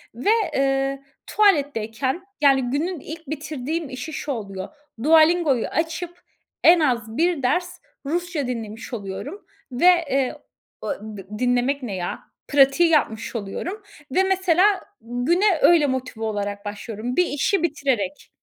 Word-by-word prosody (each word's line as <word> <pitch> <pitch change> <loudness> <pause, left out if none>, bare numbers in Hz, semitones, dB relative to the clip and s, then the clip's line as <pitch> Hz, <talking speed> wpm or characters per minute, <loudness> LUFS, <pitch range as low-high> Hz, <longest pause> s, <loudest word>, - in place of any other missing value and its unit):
ve, 255 - -1 0.2
eee, 270 0 0 0.2
tuvaletteyken, 280 - +1 0.2
yani 270 -3 +4
günün 330 +4 -1
ilk 320 +2 -9
bitirdiğim 310 0 -4
işi 255 +5 -6
şu 295 - -4
oluyor. 195 -5 -5 0.4
Dualingoyu 315 -4 +4
açıp 335 +2 -3 0.4
en 340 0 +7
az 235 -6 0
bir 335 -4 +1
ders 355 +8 0 0.3
Rusça 335 -2 -2
dinlemiş 230 0 -6
oluyorum 230 - -6 0.3
ve, 250 +8 0 0.2
eee, 265 -1 0 1.0
dinlemek 250 +3 +1
ne 205 -6 -4
ya, 175 -1 -4 0.3
pratiği 280 +4 +5
yapmış 230 -7 0
oluyorum 335 - -5 0.3
ve 375 +8 +3
mesela 380 +1 +3 0.2
güne 325 - +1
öyle 325 -4 +6
motive 260 -4 -3
olarak 205 -1 -3
başlıyorum 215 +3 -5
bir 360 - +4
işi 340 +5 0
bitirerek. 260 - -1
275 Hz, 120 wpm, -23 LUFS, 240-335 Hz, 1.0 s, en